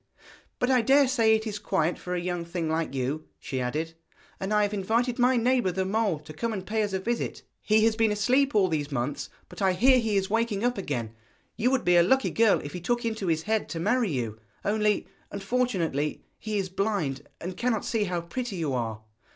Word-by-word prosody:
But 250 - +1
I 255 -2 +4
dare 275 +4 +5
say 230 -4 +4
it 220 0 -2
is 210 -2 -4
quiet 165 -4 0
for 180 0 -4
a - - 0
young 175 -1 -2
thing 170 -1 -3
like 160 -2 -1
you,' 135 +4 -2
she 130 -2 -4
added, 155 +6 -2 0.5
'and 190 +2 -3
I 210 0 +4
have 205 0 -1
invited 230 +5 0
my 250 +1 +4
neighbour 240 -4 +2
the 190 +1 -1
mole 205 -3 +1
to 155 0 -11
come 225 +9 -2
and 190 -3 -5
pay 220 +2 0
us 205 -1 -1
a 190 - 0
visit. 235 +5 -3 0.2
He 215 0 +3
has 225 -1 +3
been 225 -1 +2
asleep 255 +6 +2
all 200 -3 +5
these 150 -4 -2
months, 135 +2 -2 0.2
but - - -10
I 190 -1 +3
hear 255 +7 +5
he 220 -3 0
is 190 -1 +1
waking 225 -1 0
up 245 0 +2
again. 120 - -3 0.4
You 245 - +2
would 260 -4 0
be 175 0 +5
a - - +8
lucky 265 +10 +3
girl 225 -2 +4
if 145 - -8
he 180 - -5
took 240 +6 -1
into 220 -4 -2
his 160 -1 +1
head 220 0 -1
to 165 - -4
marry 240 +5 +1
you, 115 -7 -3 0.3
only, 210 0 +1 0.2
unfortunately, 195 - -1 0.2
he 215 -1 -3
is 190 -2 -1
blind, 190 -8 -2
and 180 +2 -5
cannot 235 0 0
see 225 -3 0
how 175 -2 -2
pretty 215 +6 -4
you 160 -6 -2
are.' 110 -3 -3
200 Hz, 225 wpm, -27 LUFS, 165-230 Hz, 0.5 s, a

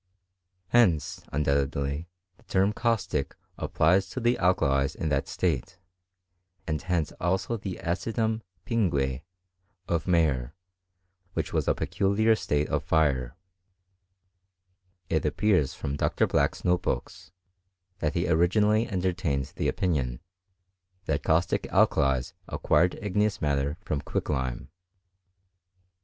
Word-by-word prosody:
Henoa( 90 - +3
undoubtedly, 70 +1 0 0.3
the - - -24
term 95 +2 +2
caustic 105 - -1 0.2
applied 85 +5 +3
to 95 +4 -7
the 120 0 +2
alkalM 70 -7 +2
in 80 - -2
that 70 -1 0
state, 95 - -1 0.9
and 75 -3 -2
hence 85 -4 -1
also 95 +6 0
the 100 -4 -5
acidum 110 +5 -1 0.2
pingne 70 - 0 0.7
ot 85 0 -1
Mayer, 75 -6 +1 0.8
which - - -3
was - - 0
a - - +3
peculiar 110 +3 +2
state 75 -7 0
of - - 0
fire. 70 -6 +1 1.7
It 80 -2 +1
appeaH 75 -1 +1
from 70 +1 -4
Dr. - - +1
Black's - - 0
note 90 0 +3
books, 70 +1 -4 0.7
that 75 -1 -1
he 85 0 +1
originally 105 +7 +3
eatarii 95 -2 0
tained 70 -8 -2
the - - -1
opinion, 70 -10 0 0.9
that 75 -2 0
caustic 80 +2 +1
alkalies 65 -2 +2
acquired, 90 +1 +2
i^eous 105 0 +1
matter 70 0 0
from 75 -8 -2
quicklime. 65 -6 -3
85 Hz, 115 wpm, -27 LUFS, 70-95 Hz, 1.7 s, Henoa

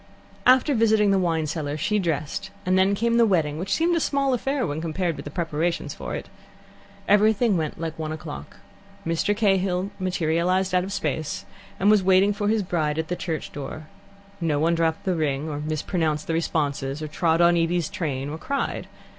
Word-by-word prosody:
After 260 +3 +5
visiting 220 -3 +4
the 195 - +3
wine 165 -3 +1
cellar, 150 -1 -3
she 210 +7 +1
dressed, 165 +2 -2 0.2
and 185 0 +2
then 190 +2 +4
came 235 +3 +1
the 235 - +6
wedding, 155 -6 +1
which 190 +2 -4
seemed 340 +1 +2
a - - +2
small 275 -3 +1
affair 270 +2 0
when 150 -1 -3
compared 170 +1 -1
with - - -8
the - - -5
preparations 165 -1 -2
for - - -5
it. - - -6 0.8
Everything 215 +1 +4
went 155 -3 -2
like 160 -1 -4
one 155 -1 -3
o'clock. 75 - -7 0.5
Mr. 165 +5 0
Cahill 195 -2 +1
materialized 185 +1 +1
out 180 0 +3
of 190 - -5
space, 155 -6 -2 0.3
and 200 +3 +5
was 210 -2 +5
waiting 190 +2 +4
for 205 0 -2
his 215 -1 +2
bride 155 -4 -1
at 160 -1 -2
the 180 - 0
church 165 -3 -4
door. 150 +2 -7 0.5
No 160 -3 +1
one 165 +2 +2
dropped 165 -1 0
the 185 - +1
ring 150 -3 -1
or 145 -2 -4
mispronounced 155 0 -1
the 165 - -2
responses, 145 -3 -1
or - - -3
trod 160 +2 +1
on 175 0 +5
Evie's 170 -1 +1
train, 140 -8 -3
or 155 +2 -6
cried. 280 +8 -2
170 Hz, 190 wpm, -24 LUFS, 155-195 Hz, 0.8 s, the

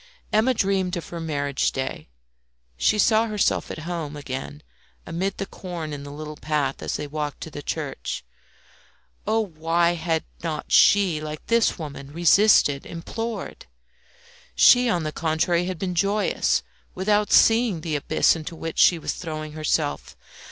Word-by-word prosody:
Emma 220 +4 +4
dreamed 195 -5 0
of 170 - -7
her 170 - -6
marriage 145 -4 -1
day; 130 - -4 0.7
she - - +2
saw 220 +2 +3
herself 210 -2 0
at - - -6
home 165 -4 -4
again 145 +1 -6 0.4
amid 185 +4 -3
the 195 - -3
corn 170 -6 -7
in 145 - -6
the 145 0 -9
little 150 +1 -7
path 145 -3 -1
as - - -3
they 150 - -3
walked 145 -1 -4
to 160 - -8
the 145 - -7
church. 145 - -4 1.0
Oh, 225 +1 +2
why 170 -2 +1
had 165 -1 -1 0.2
not 160 -3 -4
she, 190 -7 +5
like 155 0 -7
this 230 -1 +2
woman, 140 -4 -8
resisted, 170 -4 +4
implored? 225 +7 -6 0.9
She, 245 -1 +6
on 175 -6 0
the 155 - -3
contrary, 170 +2 0
had 185 -1 -4
been 180 +1 -3
joyous, 200 +4 +1 0.3
without 205 +2 +1
seeing 225 -6 +4
the 155 -1 -2
abyss 150 +3 +2
into 165 +1 -7
which 165 0 -5
she 175 - +6
was 160 - -3
throwing 155 -2 -6
herself. 155 -1 -2
165 Hz, 150 wpm, -24 LUFS, 150-195 Hz, 1.0 s, She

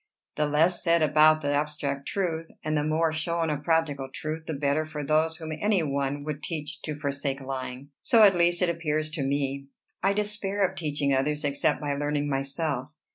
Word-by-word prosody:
The 150 0 +1
less 165 +4 +3
said 170 -2 +3
about 155 +1 +5
the 145 -1 0
abstract 145 -1 -2
truth, 165 -4 -2 0.2
and 155 0 -1
the 150 - +1
more 155 +1 +1
shown 165 0 -1
of 145 -1 -3
practical 150 -5 0
truth, 155 +3 -5
the 160 - -2
better 140 +2 +1
for 155 -1 -6
those 155 +2 +2
whom 160 -1 -6
any 195 +2 +1
one 140 0 -1
would 150 0 -4
teach 155 -3 -5
to 150 -2 -4
forsake 140 -1 -2
lying. 130 0 -6
So, 230 -2 +5
at 195 -3 +7
least, 175 +1 +3
it 180 - +3
appears 155 -2 -1
to 155 -3 -3
me. 140 0 -1 0.3
I 195 +1 +3
despair 205 -1 0
of - - -11
teaching 145 -3 0
others, 145 +3 0
except 140 0 +1
by 145 -1 -1
learning 145 0 -1
myself." 135 0 -2
150 Hz, 190 wpm, -27 LUFS, 140-165 Hz, 0.3 s, at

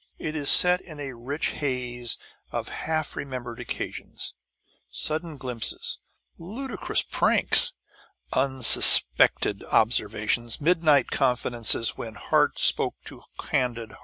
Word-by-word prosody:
It 155 0 -6
is 145 -2 0
set 180 0 +6
in 155 -4 -13
a 135 -2 -7
rich 130 +6 -4
haze 125 -4 -3 0.3
of - - -5
half 155 -1 -4
remembered 125 -4 -7
occasions, - - -5 0.6
sudden 155 0 -4
glimpses, 125 -4 -4 0.4
ludicrous 215 +6 -2
pranks, - - +5 0.6
unsuspected 130 -5 +4
observations, 110 +1 0
midnight 155 -4 +2
confidences 120 -4 0
when 110 -2 -8
heart 105 - 0
spoke - - +2
to - - -10 0.2
candid 120 -4 -3
heart. - - -16
130 Hz, 105 wpm, -24 LUFS, 120-155 Hz, 0.6 s, set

